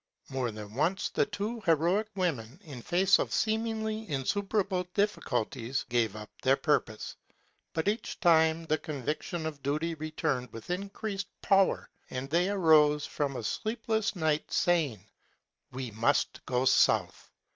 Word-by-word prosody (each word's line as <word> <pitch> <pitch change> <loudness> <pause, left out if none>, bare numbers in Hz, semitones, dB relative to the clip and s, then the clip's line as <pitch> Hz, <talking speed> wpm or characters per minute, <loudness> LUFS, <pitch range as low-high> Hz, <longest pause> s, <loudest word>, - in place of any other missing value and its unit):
More 130 -2 -1
than 105 -1 -8
once 165 - 0
the - - +1
two 210 +3 -4
heroic 175 +6 +2
women, 150 - -2
in 140 -6 -9
the - - -12
face 185 +3 +4
of - - -1
seemingly 220 -1 -1
insuperable 190 - 0
difficulties, 130 - -1
gave 115 -4 +1
up 105 -1 -9
their 135 +1 +4
purpose; 135 -6 -1 0.6
but 160 +3 -1
each 215 +2 -2
time 165 -3 +4
the 155 -1 +1
conviction 155 +4 -4
of 150 -3 -5
duty 155 +5 -1
returned 155 -5 -2
with 115 +9 -8
increased 195 +1 -3 0.2
power 195 -1 +3 0.2
and 130 +1 -4
they 175 +3 +3
arose 155 -6 +4
from 140 -3 -2
a 120 - -4
sleepless 220 - -1
night 155 -3 0
sa3dng, 155 - +1 0.4
*' - - -54
We 130 -2 -5
must 110 +2 +1
go 125 0 +1
south.'' - - +3
160 Hz, 145 wpm, -30 LUFS, 130-195 Hz, 0.6 s, face